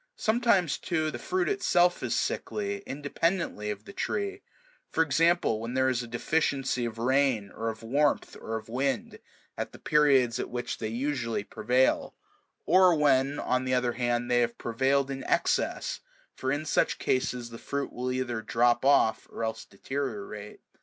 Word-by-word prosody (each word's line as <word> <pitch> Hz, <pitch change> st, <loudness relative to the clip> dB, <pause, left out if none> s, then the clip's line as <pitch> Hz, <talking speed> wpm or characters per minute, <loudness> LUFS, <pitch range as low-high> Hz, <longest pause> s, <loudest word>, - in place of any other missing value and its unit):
Sometimes, 220 Hz, -, +2 dB
too, 160 Hz, -3 st, -1 dB
the -, -, -6 dB
fruit 370 Hz, 0 st, -1 dB
itself 180 Hz, -, +2 dB
is -, -, -1 dB
sickly, 200 Hz, -1 st, -2 dB
independently 145 Hz, -, -1 dB
of 105 Hz, -, -5 dB
the 200 Hz, -, -10 dB
tree; 400 Hz, -, -2 dB, 0.5 s
for 165 Hz, -, +2 dB
example, 165 Hz, -5 st, +2 dB
when 115 Hz, +2 st, -5 dB
there 130 Hz, 0 st, +3 dB
is 125 Hz, -2 st, 0 dB
a 120 Hz, -, -7 dB
deficiency 135 Hz, 0 st, 0 dB
of 115 Hz, -1 st, -5 dB
rain, 125 Hz, -4 st, +1 dB
or 115 Hz, 0 st, -3 dB
of 110 Hz, 0 st, -7 dB
warmth, 140 Hz, +5 st, +1 dB
or 110 Hz, 0 st, -3 dB
of 110 Hz, -, -9 dB
wind, 140 Hz, -, -2 dB, 0.4 s
at -, -, -5 dB
the -, -, -10 dB
periods 135 Hz, -6 st, +3 dB
at -, -, -3 dB
which 120 Hz, 0 st, -4 dB
they 110 Hz, -, -2 dB
usually 120 Hz, -2 st, -2 dB
prevail, 125 Hz, +5 st, +1 dB, 0.5 s
or 185 Hz, -1 st, +6 dB
when, 145 Hz, -1 st, +3 dB
on 130 Hz, 0 st, 0 dB
the 130 Hz, 0 st, +1 dB
other 125 Hz, -1 st, +1 dB
hand, 120 Hz, 0 st, -1 dB
they 120 Hz, -, +4 dB
have 120 Hz, -1 st, 0 dB
prevailed 135 Hz, +4 st, +1 dB
in 135 Hz, -1 st, -5 dB
excess; -, -, 0 dB, 0.3 s
for 130 Hz, -, -2 dB
in 145 Hz, +2 st, -1 dB
such -, -, +1 dB
cases 125 Hz, -2 st, -1 dB
the 115 Hz, -, -9 dB
fruit 140 Hz, 0 st, -4 dB
will 125 Hz, +1 st, -2 dB
either 125 Hz, -3 st, -2 dB
drop 120 Hz, +2 st, +2 dB
off 135 Hz, -5 st, +3 dB
or -, -, -5 dB
else 110 Hz, 0 st, -3 dB
deteriorate. 135 Hz, -, -5 dB
130 Hz, 165 wpm, -28 LUFS, 120-155 Hz, 0.5 s, or